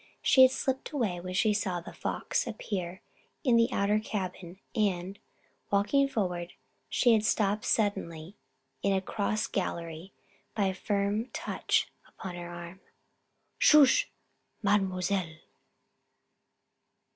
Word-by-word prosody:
She 260 - +6
had 260 - +9
slipped 265 0 -2
away 215 -11 -1
when 185 +1 -6
she 215 +3 +3
saw 195 -4 -1
The 170 - -10
Fox - - -2
appear 190 -5 -4 0.4
in 250 -5 +4
the 230 +1 +4
outer 205 0 +2
cabin 185 -4 -5 0.2
and, 195 -3 -1 0.5
walking 210 +8 +3
forward, 180 -8 -2 0.4
had - - +1
been 230 -4 +5
stopped 210 -1 +1
suddenly 195 -5 -1 0.5
in 200 - +2
a 190 - +1
cross 215 +2 -1
gallery 170 -1 -4 0.4
by 205 -2 +1
a 190 - +1
firm 200 +3 -1
touch - - 0 0.2
upon 185 - -8
her 175 0 -7
arm. 175 +1 -9 0.8
"Sh! 295 -3 +6 0.6
Mademoiselle!" 190 -4 +1
200 Hz, 120 wpm, -29 LUFS, 180-215 Hz, 0.8 s, had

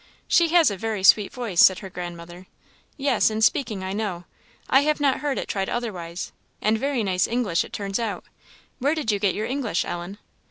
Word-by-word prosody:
"She 340 -1 +4
has 330 -5 +4
a 200 - -4
very 215 -1 -3
sweet 200 +1 +5
voice," 230 -9 -3
said 185 - +7
her - - -7
grandmother. 175 +1 -8 0.5
"Yes, 275 -6 +2
in 215 0 -3
speaking, 215 -5 +1
I 190 0 -3
know; 200 -5 -3 0.4
I 270 - +5
have 305 +1 +1
not 280 -2 +2
heard 290 -1 -2
it - - -3
tried 195 -1 -2
otherwise; 185 -8 -4 0.3
and 215 +1 +2
very 275 -3 -1
nice 185 -2 +1
English 220 -7 0
it - - -12
turns 200 +1 -3
out. 225 -3 -3 0.5
Where 285 +5 +1
did 300 -8 -1
you 205 - -1
get 195 -2 +1
your 215 - -2
English, 250 -8 -1
Ellen?" 175 +3 -6
215 Hz, 200 wpm, -24 LUFS, 185-255 Hz, 0.5 s, said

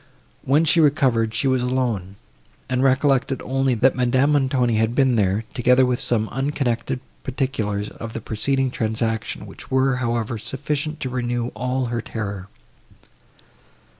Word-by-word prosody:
When 145 +5 +3
she 165 - +4
recovered, 130 -7 +3
she 125 +4 +1
was 130 -1 +2
alone, 120 -7 -1 0.5
and 125 0 0
recollected 135 0 +2
only, 135 -1 +1
that 125 +4 +3
Madame 130 +3 +2
Montoni 130 -5 +2
had 110 +2 +1
been 130 -3 +3
there, 100 0 +1
together 125 +2 +4
with 125 -1 0
some 110 -2 0
unconnected 130 -2 -1 0.2
particulars 110 -6 -2
of 115 -1 -8
the - - -4
preceding 130 +5 0
transaction, 110 -1 -2
which - - -12
were, 130 0 +2
however, 120 -2 -2
sufficient 145 +6 -3
to 130 - -3
renew 120 -1 -1
all 125 +3 -2
her 120 - -1
terror. 100 -4 -5
125 Hz, 140 wpm, -22 LUFS, 115-135 Hz, 0.5 s, she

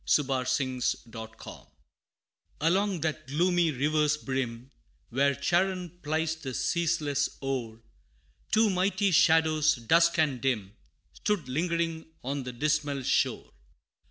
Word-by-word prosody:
[Illustration: 130 -2 -1 0.2
The 115 -1 -8
Two 110 - -25
Shades] - - -11 0.9
Along 185 +2 +1
that 155 -1 -3
gloomy 175 +4 +2
river's 150 +2 +1
brim, 130 -3 -4 0.4
Where 140 +3 +2
Charon 175 +3 0
plies 160 +1 -1
the 135 -6 -6
ceaseless 160 -5 0
oar, 120 -5 -4 0.7
Two 220 -1 +4
mighty 190 +1 +1
Shadows, 160 -1 +4
dusk 165 +8 +3
and 145 -6 +1
dim, 110 -6 -1 0.4
Stood 205 -10 -2
lingering 165 +3 -1 0.2
on 140 +2 -2
the 125 -1 -6
dismal 145 +1 -1
shore. - - 0
150 Hz, 115 wpm, -28 LUFS, 130-170 Hz, 0.9 s, Two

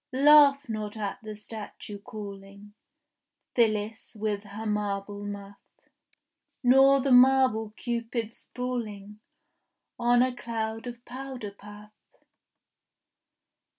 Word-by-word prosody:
Laugh 285 0 +6
not 215 -1 -4
at 205 -2 -4
the 215 -1 -7
statue 210 -1 -8
calling 200 -1 -10 0.8
Phyllis 220 -1 0
with 210 -1 -2
her 205 +2 -7
marble 205 -1 -2
muff, 200 0 -7 1.0
Nor 270 +2 +6
the 275 0 0
marble 255 -3 +5
cupids 235 -1 -3
sprawling 215 -5 -5 0.8
On 240 +1 +4
a 255 -1 -1
cloud 225 -1 -4
of 240 0 -9
powder 255 -4 -7
puff. 210 +1 -13
220 Hz, 95 wpm, -28 LUFS, 205-245 Hz, 1.0 s, Laugh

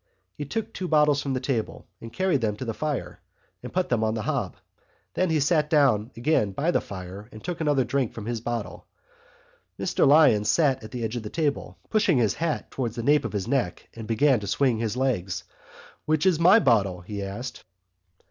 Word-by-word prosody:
He 145 - -6
took 220 +10 -4
two 185 - -4
bottles 150 -3 +3
from 135 -2 -2
the - - 0
table 125 -4 -3 0.2
and, 115 - -9
carrying 185 -3 +1
them 110 -3 -1
to 115 - -6
the 115 - -3
fire, 150 +2 -4 0.5
put 185 0 -1
them 115 -3 +1
on 110 0 0
the 110 - -3
hob. - - -2 0.6
Then 185 -1 +1
he 160 -1 +2
sat 150 +1 +2
down 135 -8 +3
again 115 -6 +1
by 160 - 0
the - - +1
fire 95 +2 -9
and 110 - -12
took 175 -2 -4
another 145 -4 +2
drink 135 -2 -1
from 110 - -8
his 115 -1 -3
bottle. 115 -6 -5 0.9
Mr - - +2
Lyons 135 -8 +5
sat 135 +2 +2
on 110 - -8
the 125 -2 -5
edge 110 +1 -3
of - - -4
the 105 - -7
table, 150 0 -2
pushed 215 0 +2
his 120 - +3
hat 165 -2 -3
towards 120 -4 -3
the 115 - -4
nape 145 +3 +3
of - - -4
his 100 0 -2
neck 135 0 -2
and 115 -1 -8
began 125 +3 +3
to 100 - -7
swing 125 +2 +1
his 115 +1 -2
legs. 110 -9 -1 0.6
"Which 155 +1 +1
is 180 -4 +3
my 180 +5 +7
bottle?" 100 - +2
he 100 +3 -6
asked. 105 +6 -6
125 Hz, 205 wpm, -25 LUFS, 110-150 Hz, 0.9 s, my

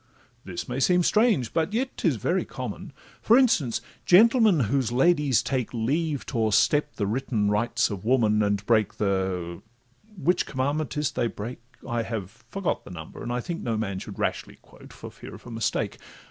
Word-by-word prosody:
This 90 -3 -6
may 125 +2 -3
seem 180 +6 +3
strange, 210 - +2
but 165 +5 0
yet 255 +4 -1
'tis - - +1
very - - 0
common; - - -7 0.3
For 230 - +5
instance—gentlemen, 195 - +3
whose 125 +2 0
ladies 140 0 +3
take 130 -4 -2
Leave 145 +5 -1
to 120 - -3
o'erstep 110 +7 +2
the 105 - -1
written 105 -1 0
rights 115 +2 +1
of 100 -3 -5
woman, 110 -3 +3
And 100 -1 0
break 110 -2 +2
the—Which 110 - -3
commandment 140 0 -2
is 150 -2 0
't - - -27
they 120 - +2
break? 115 +2 -6 0.3
(I 120 -2 -1
have 110 -4 -5 0.2
forgot 195 -3 -2
the - - -12
number, 80 -4 -9
and 120 0 -3
think 170 -1 -4
no 115 -2 -1
man 100 -3 -2
Should - - -9
rashly - - -2
quote, - - -17
for - - -10
fear - - -11
of - - -15
a 120 - -9
mistake.) 115 -1 -2
120 Hz, 175 wpm, -26 LUFS, 110-155 Hz, 0.3 s, For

